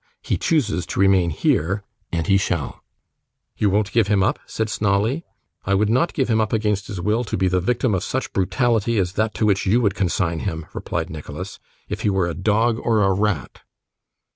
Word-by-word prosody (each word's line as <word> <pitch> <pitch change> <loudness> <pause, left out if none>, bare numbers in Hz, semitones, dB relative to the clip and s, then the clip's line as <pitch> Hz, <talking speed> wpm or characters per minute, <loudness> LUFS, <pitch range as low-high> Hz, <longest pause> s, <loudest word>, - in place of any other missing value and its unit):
He - - 0
chooses 130 - 0
to - - -4
remain 95 -3 +4
here, 90 +5 0 0.3
and 85 -2 -1
he 95 - +3
shall.' 90 -6 -1 0.7
'You 105 - +2
won't 100 +1 +1
give 115 -3 +3
him 100 -2 +3
up?' 105 - +1
said 110 - -2
Snawley. 105 +8 0 0.4
'I 100 - +2
would 105 +2 +2
not 130 +9 +1
give 135 -5 +1
him 110 -2 +2
up 110 - -1
against 105 -2 0
his 100 -5 -5
will, 105 +6 +1
to 110 - -3
be 95 0 +2
the 90 0 +2
victim 120 +3 +1
of 95 - 0
such - - -3
brutality 110 +4 +1
as 90 -2 0
that 110 +2 -1
to 110 - +1
which 100 -2 +1
you 110 +6 +4
would 105 -6 +2
consign 90 -3 0
him,' 80 +3 -4
replied - - -3
Nicholas, 80 +4 -7 0.3
'if - - -4
he - - +1
were 95 -2 +1
a 85 - -2
dog 110 +5 +1
or 110 -3 +2
a 95 0 +3
rat. 100 - -1
100 Hz, 205 wpm, -22 LUFS, 95-110 Hz, 0.7 s, remain